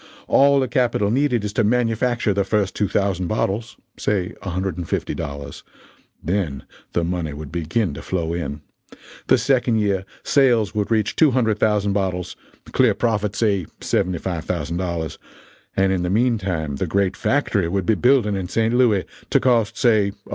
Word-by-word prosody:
All 140 0 +5
the 130 - +1
capital 120 -7 +1
needed 125 -3 +1
is 105 - -4
to 115 - +2
manufacture 120 0 +1
the 100 0 +1
first 100 -1 0
two 105 - +1
thousand 95 -2 0
bottles 110 +3 -2 0.2
say 95 -4 -1
a 100 - -5
hundred 95 0 -2
and 85 -1 -6
fifty - - -1
dollars 70 -1 -6 0.6
then 85 -6 -2 0.3
the 85 - +1
money 85 -3 -2
would 75 -1 -8
begin 85 +2 -1
to - - -7
flow 85 -3 -2
in. 75 -4 -4 0.7
The - - +5
second 125 -3 +2
year, 100 -3 +1 0.2
sales 120 -7 +3
would 105 -2 -1
reach 110 -2 +1
200,000 110 -7 +2
bottles 95 -3 -2 0.4
clear - - +3
profit, 105 -4 0
say, 100 -6 +1
$75,000 85 -2 -2 0.6
and 95 0 +3
in 90 - 0
the 90 - -1
meantime 95 - 0
the - - -2
great 100 -1 +1
factory 110 -10 +1
would 95 +1 -1
be 110 - +3
building 120 -3 +3
in 95 -2 -3
St. 115 +4 0
Louis, 120 -6 +3 0.2
to - - +4
cost, 115 -3 +2
say, 105 -5 +3
$100,000. - - -17
100 Hz, 160 wpm, -21 LUFS, 90-115 Hz, 0.7 s, All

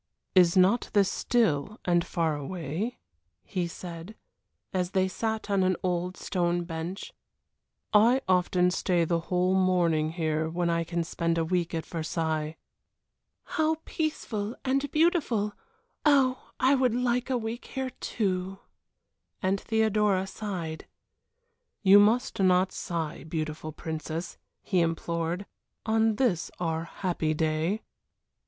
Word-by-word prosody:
"Is 180 -1 +5
not 190 +6 +4
this 200 -2 +4
still 215 -4 +1
and 175 -1 +3
far 165 -3 0
away?" 165 - -4 0.5
he 180 -4 -2
said, 170 +3 -8 0.6
as 180 -2 0
they 190 -1 +3
sat 220 +3 -2
on 200 -2 +2
an 185 0 +3
old 180 0 -1
stone 175 -1 0
bench. 170 +3 -5 0.8
"I 235 +5 +5
often 180 -1 +3
stay 180 -2 +1
the 170 +1 +1
whole 180 +1 +2
morning 170 -4 +2
here 160 -2 0
when 170 +1 0
I 170 0 +1 0.2
spend 170 0 -1
a 165 - +1
week 175 0 0
at 160 - -3
Versailles." 160 -1 -2 0.9
"How 315 -1 +1
peaceful 235 -9 -3
and 275 +2 +1
beautiful! 290 - +2 0.5
Oh, 270 -4 +3
I 260 +2 +4
would 255 -4 +2
like 250 0 0
a 255 - +2
week 230 +1 -5
here, 265 -1 -4
too!" 190 -3 -2 0.8
and 190 +1 0
Theodora 210 -3 +2
sighed. 185 -6 -5 1.0
"You 200 +1 +8
must 225 +5 +3
not 185 0 +4
sigh, 165 -5 -4
beautiful 155 -1 -4
princess," 160 +2 -5 0.2
he 185 - +1
implored, 170 +2 -1 0.4
"on 220 0 +2
this 205 -9 +1
our 165 -1 -1
happy 170 -4 -2
day." 160 +6 0
185 Hz, 125 wpm, -28 LUFS, 165-220 Hz, 1.0 s, You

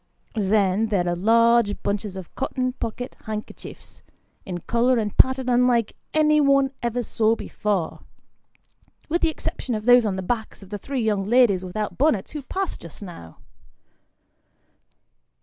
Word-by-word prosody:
Then, 205 0 +2
there 190 -5 0
are 175 - 0
large 230 +2 +3
bunches 200 -1 -2
of 190 -3 -9
cotton 255 -1 -2
pocket 245 +1 -5
handkerchiefs, 215 0 -8 0.5
in 180 -2 -3
colour 240 +5 +2
and 210 -3 -2
pattern 260 0 +3
unlike 245 -2 +2 0.2
any, 305 -1 +4
one 275 -1 +3
ever 240 0 -1
saw 220 0 +1
before, 200 -7 -2 1.1
with 340 +3 0
the 330 - +3
exception 260 -5 -4
of 215 0 -5
those 245 0 +7
on 205 -3 -1
the 190 - -4
backs 220 0 -3
of 195 - -15
the 205 - -4
three 270 +4 -3
young 210 -3 0
ladies 225 -6 +4
without 205 +5 -4
bonnets 260 -9 +2
who 300 - -5
passed 380 +7 -4
just 170 +4 -11
now. 125 - -11
225 Hz, 150 wpm, -23 LUFS, 200-255 Hz, 1.1 s, those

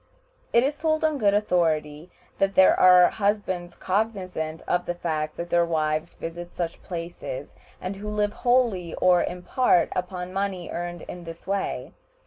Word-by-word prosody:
It 235 - +5
is 285 +2 -1
told 315 0 +1
on 310 -2 +1
good 205 -3 +3
authority 160 -5 0 0.3
that 195 0 +1
there 190 - +7
are 180 -1 +7
husbands 200 -4 -1
cognizant 185 -6 -2
of 175 0 0
the 175 - -1
fact 155 -3 -3
that 170 0 -5
their 170 0 +4
wives 155 -2 -1
visit 170 +1 -7
such 170 -2 -3
places, 175 - -6 0.3
and 185 +2 -5
who 210 +1 -6
live 210 0 0
wholly 235 -9 +1
or 180 -1 +4
in 180 0 -4
part 215 -9 +3
upon 180 0 -4
money 195 -2 -2
earned 175 -1 -5
in 175 - -8
this 165 0 -9
way. 195 +1 -2
180 Hz, 160 wpm, -25 LUFS, 170-205 Hz, 0.3 s, there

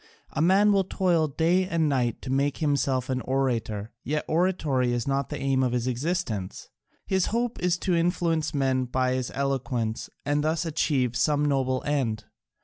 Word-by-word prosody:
A 150 - -2
man 195 +5 +5
will 195 -1 +3
toil 175 -4 +1
day 170 +6 +1
and 165 -3 +1
night 125 -5 0
to 130 - -4
make 140 +1 +1
himself 140 -4 0
an 130 -2 -1
orator, 115 -6 -1
yet 150 +3 -2
oratory 155 -8 +1
is 120 0 -2
not 140 -1 0
the 150 - -4
one 135 - -6
aim 135 -1 +2
of 125 -2 +1
his 120 -1 0
existence: 125 - -3 0.4
his 190 -1 +1
hope 235 +1 -1
is 180 -1 +1
to 180 +1 -1
influence 165 -2 +1
men 135 -3 +1
by 130 +1 0
his 130 -1 -2
eloquence 125 -5 -2 0.2
and 145 +1 +1
thus 160 +2 0
achieve 140 -6 0
some 150 +1 +2
noble 130 -2 0
end. 120 -7 -1
140 Hz, 175 wpm, -26 LUFS, 130-165 Hz, 0.4 s, man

